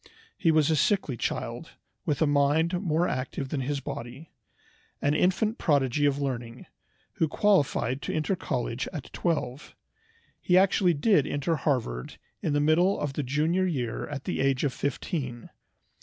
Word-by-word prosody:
He 165 - +1
was 155 -1 +4
a - - +3
sickly 155 - +1
child, - - -4 0.3
with 150 +2 +1
a - - +4
mind 150 +5 +2
more 170 -1 +1
active 130 +1 -3
than 140 -2 -2
his 140 +2 -2
body, 125 +5 -7 0.7
an 145 - +1
infant 190 +7 +1
prodigy 145 -2 +2
of 140 0 0
learning, 120 -4 -4 0.5
who 160 - +2
qualified 145 - +1
to - - -3
enter 155 +5 0
college 125 -6 -3
at 150 -6 -8
twelve. 150 -5 -2 0.7
He 180 - +3
actually 185 -2 +4
did 155 -1 +3
enter 145 +3 0
Harvard 125 - -2 0.2
in 155 - -1
the 145 - +2
middle 160 +6 +3
of 145 -2 -2
the 150 - -2
junior 155 +8 +1
year 125 -9 -2
at 140 -2 -6
the - - -3
age 135 -1 +1
of 140 -3 0
fifteen. 135 - -4
145 Hz, 155 wpm, -27 LUFS, 135-165 Hz, 0.7 s, was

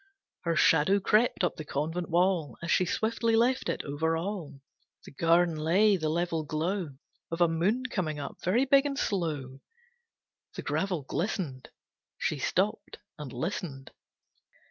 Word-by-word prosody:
Her 165 -1 +1
shadow 160 +6 +4
crept 215 +2 +2
up 175 - 0
the 155 - -5
convent 160 +5 -3
wall 170 -6 +1
As 170 - -2
she 185 - +3
swiftly 225 +4 0
left 245 +3 +2
it, - - -2
over 160 +3 -1
all 165 -6 -5 0.5
The - - -11
garden 165 +3 +3
lay 185 +7 +3
the 155 -4 -1
level 165 0 -1
glow 155 +1 -2 0.3
Of 165 - -4
a 175 - +5
moon 180 +10 +1
coming 175 -11 -2
up, 140 -1 -6
very 230 +9 +2
big 275 +1 +4
and 275 -1 -4
slow. 150 - -2 0.9
The - - -5
gravel 180 -6 -1
glistened. 155 - -3 0.5
She 150 - -1
stopped 205 +8 -1 0.2
and 145 -4 -6
listened. 140 -2 -4
170 Hz, 145 wpm, -29 LUFS, 155-200 Hz, 0.9 s, a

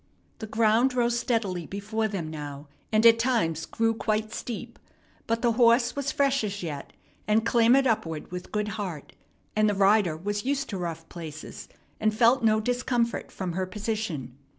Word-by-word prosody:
The 220 - -6
ground 225 +4 +3
rose 240 -1 +2
steadily 200 -9 -1
before 215 +3 -2
them 195 -6 -4
now, 145 -1 -7 0.2
and 220 +1 +3
at 230 0 +8
times 220 -11 0
grew 225 0 +1
quite 215 -1 -1
steep; 235 0 -6 0.5
but 230 +1 -1
the 240 - +4
horse 235 +1 +4
was 280 +1 -1
fresh 275 -3 +2
as 205 -2 -4
yet, 150 -4 -5 0.4
and 220 +1 +3
clambered 240 +3 +4
upward 175 - -1
with 180 0 -7
good 210 0 -1
heart; 195 -8 -6 0.4
and 215 0 +3
the 205 - 0
rider 195 -4 +3
was 205 +4 -3
used 275 +1 -1
to 195 - -4
rough 165 -2 -5
places, 155 -3 -9 0.3
and 215 0 +1
felt 240 +2 +4
no 215 -1 +4
discomfort 245 0 -1
from 185 -2 -4
her 185 +2 -2
position. 205 - -4
215 Hz, 170 wpm, -27 LUFS, 185-235 Hz, 0.5 s, at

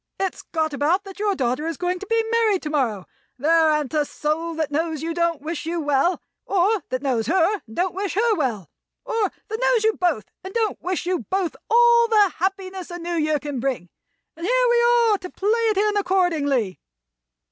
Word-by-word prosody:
It's 385 -2 -2
got 315 -2 -2
about 315 +8 +1
that 390 0 -11
your 410 -1 +1
daughter 260 +2 -1
is 330 -3 -3
going 360 0 -1
to 400 - -8
be 455 +1 +2
married 445 -5 +2
to 300 - -4
morrow. 230 -10 0 0.3
There 320 +4 +4
an't 300 -3 0
a 305 -1 +2
soul 315 +3 -3
that 315 -2 -2
knows 320 0 -1
you 330 - -2
that - - -5
don't 335 -3 +1
wish 320 0 -4
you 340 +1 -1
well, 295 +4 +1 0.3
or 395 +2 +2
that 255 +1 -3
knows 245 -5 0
her 375 +4 +2
and 220 - -12
don't 365 +1 0
wish 390 -1 -3
her 445 +1 +3
well. 230 - -2 0.3
Or 445 -4 0 0.2
that 440 +1 -4
knows - - +3
you 440 0 +3
both 330 - 0 0.2
and 380 +3 -8
don't 445 -2 0
wish 365 0 -2
you 360 -1 0
both 375 -3 -1
all 470 0 +5
the 420 -4 +4
happiness 380 0 -3
the 350 - -7
New 345 0 -4
Year 310 -2 +1
can 290 -3 -5
bring. 240 -9 -2 0.5
And 335 - -10
here - - +3
we 475 0 +4
are, 475 -3 +4
to 365 - -8
play 395 +3 -2 0.2
it 425 - 0
in 415 +1 +2
accordingly." 320 - +1
350 Hz, 210 wpm, -23 LUFS, 300-405 Hz, 0.5 s, all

